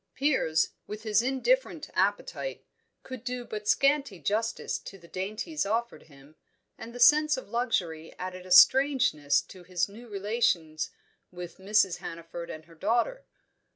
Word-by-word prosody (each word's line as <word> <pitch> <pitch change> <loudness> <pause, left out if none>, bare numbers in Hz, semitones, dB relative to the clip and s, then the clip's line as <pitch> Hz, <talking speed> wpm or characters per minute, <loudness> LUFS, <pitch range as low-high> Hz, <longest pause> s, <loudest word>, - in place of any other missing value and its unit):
Piers, 260 - +2 0.2
with 210 +1 -7
his 215 -1 +3
indifferent 270 - 0
appetite, - - -1 0.4
could 255 -3 -8
do 250 -1 -4
but 210 -2 -6
scanty 275 -4 +2
justice 215 +8 -1
to 195 - -10
the 170 -2 -17
dainties 215 - -3
offered 230 +4 -2
him, 140 +1 -18 0.4
and 230 - -9
the 245 - -9
sense 300 +3 +6
of 260 - -8
luxury 175 -10 -1
added 185 0 -6
a - - -12
strangeness 235 - +5
to 185 - -14
his 175 0 -1
new 225 +4 -12
relations 195 -7 0 0.4
with 180 -1 -9
Mrs. 195 -2 +2
Hannaford 170 +1 -8
and 155 0 -8
her 170 - -17
daughter. 235 - 0
210 Hz, 145 wpm, -28 LUFS, 175-250 Hz, 0.4 s, sense